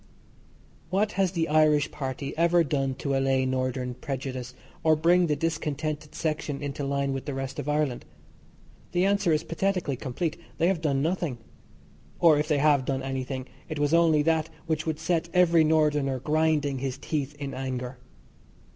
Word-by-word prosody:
What 200 +4 +1
has 195 -2 +1
the 165 -2 0
Irish 150 -1 +3
Party 135 0 -4
ever 170 +1 +4
done 135 -2 -1
to 140 0 -2
allay 135 -1 +2
Northern 130 -1 -1
prejudice, 130 -1 -5 0.3
or 160 -1 +5
bring 170 +3 +4
the 150 - +1
discontented 155 -1 -3
section 155 -3 -2
into 145 0 -4
line 140 0 0
with 135 - -4
the 145 - -4
rest 135 0 -4
of 145 - -3
Ireland? 150 -4 0 0.9
The 180 +1 +3
answer 200 -3 +2
is 155 0 +2
pathetically 180 -4 -1
complete. 145 +6 -3 0.2
They 170 - +3
have 185 -4 0
done 140 -3 +1
nothing. 165 -6 -1 0.8
Or, 160 -4 +6
if 150 - -1
they 150 -2 +2
have 145 -2 +4
done 130 0 -2
anything, 130 -1 -3 0.2
it 155 - -4
was 145 +1 +1
only 165 -3 +4
that 160 0 +1 0.2
which 160 -1 -1
would 160 -1 -1
set 170 0 -1
every 170 -2 +5
Northerner 150 -4 +2
grinding 150 -1 +1
his 135 -1 -3
teeth 145 -1 -3
in 140 -2 -5
anger. 130 -1 -4
150 Hz, 165 wpm, -27 LUFS, 135-160 Hz, 0.9 s, Or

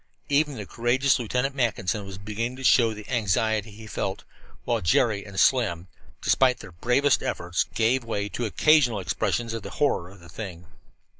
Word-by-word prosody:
Even 145 0 +2
the 105 -4 -6
courageous 125 +6 +1
Lieutenant 125 +4 -1
Mackinson 105 -6 -1
was 95 -1 -8
beginning 110 +5 -4
to 135 - -9
show 120 -3 +5
the 105 -1 -9
anxiety 110 -1 0
he 110 +2 -12
felt, 95 -2 -4 0.4
while 115 -2 0
Jerry 100 +4 +2
and 100 -2 -6
Slim, 100 -10 +2 0.4
despite 130 -2 +3
their 95 - -11
bravest 125 - +2
efforts, 90 0 -1
gave 120 +3 +2
way 105 -3 -2
to 120 - -3
occasional 130 -1 +3
expressions 115 +6 -1
of 115 - -4
the - - -7
horror 110 -12 +1
of 100 0 -15
the 85 - -15
thing. 90 -4 -8
115 Hz, 170 wpm, -25 LUFS, 100-125 Hz, 0.4 s, show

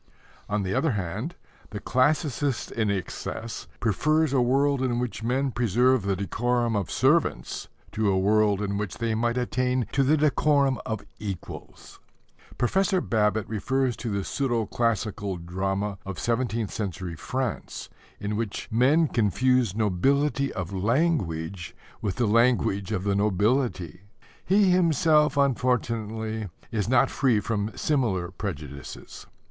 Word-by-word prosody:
On 105 -1 0
the 95 0 -2
other 160 +2 +1
hand, 105 - -4 0.3
the 105 - -6
classicist 140 0 0
in 110 -3 0
excess 100 +3 -4
prefers 155 +7 +1
a 130 - +3
world 135 +2 +2
in 125 -2 0
which 120 -2 -3
men 130 +4 0
preserve 125 +2 +2
the 100 0 0
decorum 120 +4 0
of 100 -3 -1
servants - - +1 0.2
to 110 -1 0
a 95 - +2
world 105 +1 +3
in 100 0 -2
which 95 -7 -4
they 115 -1 -1
might 120 +2 0
attain 125 0 0
to 135 - +2
the 145 +4 +3
decorum 140 -3 +2
of 110 -2 -4
equals. 100 -4 -8 0.6
Professor 190 - +2
Babbitt 105 - +1
refers 125 +3 0
to 120 - -4
the 100 -2 -1
pseudo 120 -3 -1
classical 105 -5 -1
drama 95 +3 -3
of 95 -1 -6
seventeenth 115 -3 -1
century 90 -4 -4
France, 130 - -4 0.3
in 105 +1 -3
which 110 -2 -4
men 140 +8 +4
confused 120 -1 +1
nobility 140 +8 +1
of 90 +1 -5
language 95 - -1 0.3
with 100 -4 -2
the 120 - +1
language 110 -3 +2
of 95 -4 -1
the 100 0 +1
nobility. 100 - 0 0.4
He 195 0 +4
himself 160 -4 +3
unfortunately 115 -5 0 0.2
is 110 -1 -1
not 130 -1 +4
free 125 -6 +2
from 105 0 -3
similar 105 - 0
prejudices. 75 - -7
115 Hz, 135 wpm, -26 LUFS, 100-130 Hz, 0.6 s, men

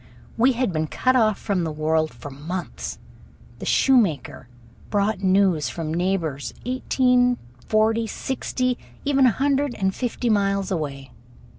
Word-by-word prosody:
We 255 +3 +4
had 245 -5 -1
been 155 0 -1
cut 255 +10 +1
off 215 -4 +3
from 190 -4 -1
the 160 - -2
world 155 +1 0
for 130 +4 -10
months. 165 +7 -5 0.6
The - - -6
shoemaker 165 - +2 0.4
brought 205 -1 0
news 190 -4 +3
from 160 -2 -4
neighbors 170 -5 -1
eighteen, 250 -1 +2 0.3
forty, 220 +1 +2
sixty, 255 +1 -2 0.3
even 275 -2 +4
a - - +5
hundred 280 0 0
and 190 -1 0
fifty 245 +1 -3
miles 200 -2 +1
away. 140 -6 -4
200 Hz, 135 wpm, -23 LUFS, 160-245 Hz, 0.6 s, a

